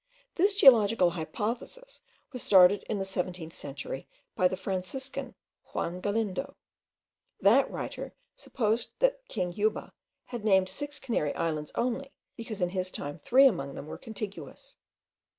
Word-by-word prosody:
This 395 +3 +2
geological 225 - +6
hypothesis 225 - -5 0.3
was 250 - -5
started 190 +1 +6
in 215 - 0
the 195 - -2
seventeenth 180 -3 -4
century 140 -1 -6 0.3
by 185 - +4
the 185 - -4
Franciscan, 190 +8 -4 0.4
Juan 180 +2 -3
Galindo. 220 +6 -2 0.8
That - - +5
writer - - -6 0.2
supposed 230 - -1
that - - +2
king 180 - -2
Juba 215 +3 -1 0.3
had 240 -3 -6
named 190 -3 +4
six 290 +9 -5
Canary 225 - -1
Islands 155 -2 -2
only, 255 +3 -1 0.2
because, 225 -4 -5
in 175 - +1
his 185 0 -2
time, 145 -1 -6
three 265 - +5
among 140 - +2
them - - -7
were 155 - -8
contiguous. 215 -3 -8
200 Hz, 135 wpm, -29 LUFS, 180-245 Hz, 0.8 s, geological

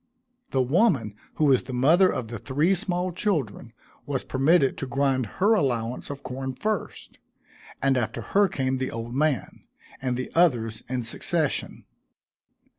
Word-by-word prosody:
The 130 -1 +1
woman 135 - +2 0.2
who 155 - +2
was 135 -3 +4
the 130 - -6
mother 165 +9 +5
of 115 -3 -4
the 115 -2 -6
three 150 - +1
small 185 -2 -1
children, 150 - -2 0.4
was 140 -2 -2
permitted 135 +1 +3
to 135 - -4
grind 135 -2 0
her 205 +4 +4
allowance 125 - -1
of 145 -1 -7
corn 130 +1 -5
first, 215 +6 -4 0.6
and 135 -1 +3
after 120 -3 -2
her 200 0 +3
came 130 -5 -1
the 130 0 -2
old 115 +1 -6
man, 145 0 -1 0.4
and 125 -2 -1
the 130 - -5
others 120 -11 +2
in 125 -1 -2
succession. 150 +6 -2
135 Hz, 150 wpm, -25 LUFS, 125-170 Hz, 0.6 s, mother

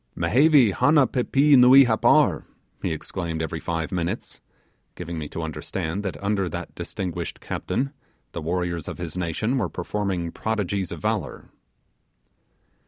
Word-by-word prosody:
'Mehevi 140 -3 +4
hanna 140 - +4
pippee 140 +3 +3
nuee 130 +2 +8
Happar,' 110 -2 +3 0.3
he - - -1
exclaimed 85 -3 -4
every 80 0 -3
five 80 -1 -3
minutes, 90 +4 -4 0.5
giving 85 -2 -6
me 75 -2 -6
to 85 - -5
understand 80 +3 -4
that 95 -7 -4
under 100 -2 0
that - - -6
distinguished 90 -4 -5
captain 135 +2 -3 0.4
the 85 - -5
warriors 85 0 -2
of - - -6
his 85 -2 -6
nation 90 +9 -1
were - - -1
performing 90 -2 -3
prodigies 100 -4 -2
of - - -6
valour. - - -3
95 Hz, 135 wpm, -24 LUFS, 85-120 Hz, 0.5 s, nuee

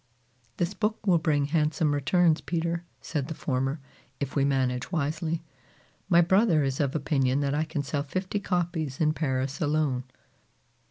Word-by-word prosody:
"This 175 +2 0
book 215 0 -2
will 180 -4 +4
bring 150 -2 +1
handsome 150 0 +1
returns, 160 +3 +3
Peter," 170 0 -2 0.2
said 145 -4 -3
the 160 - -5
former, 135 +2 -1 0.4
"if 140 -1 -4
we 140 - +3
manage 130 0 0
wisely. 160 +1 -1 0.7
My 170 -2 +6
brother 175 -3 +4
is 135 -1 -1
of 140 -1 0
opinion 135 -2 +1
that 140 0 0
I 155 +2 +1
can 155 -2 -3
sell 140 +1 -2
fifty 185 +7 -3
copies 170 -7 -2
in 155 -1 +3
Paris 135 -3 -2
alone!" 145 -4 +1
155 Hz, 155 wpm, -27 LUFS, 140-170 Hz, 0.7 s, My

